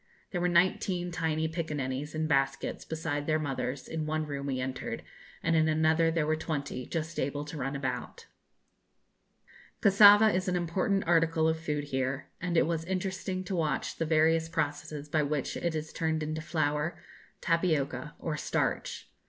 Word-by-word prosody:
There 175 - -1
were 180 - +2
nineteen 175 0 +2
tiny 160 -2 0
piccaninnies, 150 -3 -3
in 155 0 0
baskets, 135 -2 0
beside 155 -2 -3
their 155 -1 +3
mothers, 135 -3 -3
in 160 -1 -3
one 155 0 -1
room 140 -1 -4
we 130 -2 -1
entered, 130 0 -4 0.4
and 165 0 +2
in 160 0 +4
another 160 +1 +3
there 165 -2 +1
were 155 +1 +2
twenty 145 -5 -4
just 165 +1 -3
able 145 +2 -2
to 150 - -8
run 135 +1 -2
about. 130 -3 -4 1.5
Cassava 205 +2 +8
is 185 +1 0
an 180 - +1
important 180 +3 0
article 165 -1 +3
of 160 0 +1
food 150 -2 -2
here, 135 -1 -2
and 175 -1 0
it - - +5
was 165 0 -1
interesting 185 0 -2
to 185 +1 -3
watch 160 -3 -1
the 165 - 0
various 160 +1 +3
processes 150 -2 -3
by 150 +1 +1
which 145 -2 -1
it 170 -2 -1
is 155 0 -4
turned 160 -1 0
into 155 +1 -3
flour, 150 0 -1 0.4
tapioca, 160 -3 0
or 155 -3 -3
starch. - - -2
160 Hz, 165 wpm, -30 LUFS, 145-165 Hz, 1.5 s, Cassava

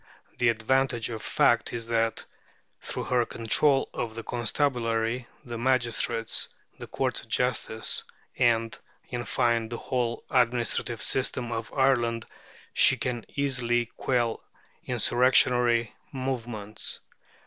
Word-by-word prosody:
The 125 - +4
advantage 120 +1 +1
of 110 -1 -5
fact - - +2
is 115 -1 -4
that, 115 -1 0 0.6
through - - -4
her 125 -1 +2
control 135 +5 +2
of 110 -2 -4
the 115 - -6
constabulary, 120 -1 -1 0.2
the 120 -2 -6
magistrates, 120 -2 +1 0.3
the - - -8
courts - - -1
of - - -17
justice, 115 -3 0 0.3
and, 115 -1 +2 0.3
in 120 -1 -4
fine, 115 0 +1
the 120 - -4
whole 120 -2 -2
administrative 120 -2 +1
system 125 -2 +1
of 115 -1 -4
Ireland, 120 -4 +1 0.5
she - - +5
can 120 -3 -3
easily 125 -4 +1
quell 120 -3 0 0.4
insurrectionary 120 -2 +3 0.2
movements. 120 -6 -3
120 Hz, 115 wpm, -27 LUFS, 115-125 Hz, 0.6 s, she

